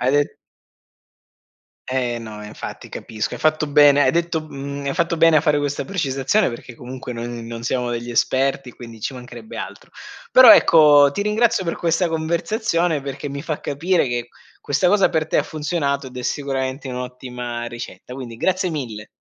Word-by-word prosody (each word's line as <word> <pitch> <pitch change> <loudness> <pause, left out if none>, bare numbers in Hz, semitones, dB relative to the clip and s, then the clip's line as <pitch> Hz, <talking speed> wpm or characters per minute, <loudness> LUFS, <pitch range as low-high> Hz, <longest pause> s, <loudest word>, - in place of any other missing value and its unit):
Hai 130 - +2
de 145 - +5 1.7
Eh, 125 -2 -1
no. 110 -2 -9
Eh - - -8
infatti, 105 - -8
capisco. 110 -1 -5
Hai - - -9
fatto 155 -1 +2
bene 145 -1 +6
hai 130 - +4
detto 170 -1 0
mhmm, 140 -2 -7
hai 140 - -1
fatto 170 0 0
bene, 165 -1 +5
a - - +5
fare 150 -2 +2
questa 145 0 -2
precisazione, 165 +1 0
perché 120 0 -9
comunque 125 +1 -8
noi 115 0 -5
n 120 -1 -7
non 115 0 -7
siamo 125 0 -1
degli 120 0 -4
esperti, 130 +2 0
quindi 115 -2 -12
ci 135 - -4
mancherebbe 130 - -10
altro. - - -8 0.4
Però, 255 0 +10
ecco, 145 -3 +7
ti 200 - -2
ringrazio 210 -1 +2
per 165 - -2
questa 170 +1 +1
conversazione, 170 +1 0
perché 140 +1 -5
mi 140 +1 -6
fa 155 -3 -4
capire 165 +3 0
che 120 0 -3 0.3
questa 145 +6 0
cosa 200 +2 +4
per 160 -2 0
te - - +1
ha - - +3
funzionato, 150 -3 -2
ed 125 0 -11
è 125 - -5
sicuramente 135 0 -3
un'ottima 125 -1 -5
ricetta. 120 +1 -8
Quindi, 125 -3 -8
grazie 185 +4 0
mille. 115 -9 -5
140 Hz, 180 wpm, -21 LUFS, 125-160 Hz, 1.7 s, Però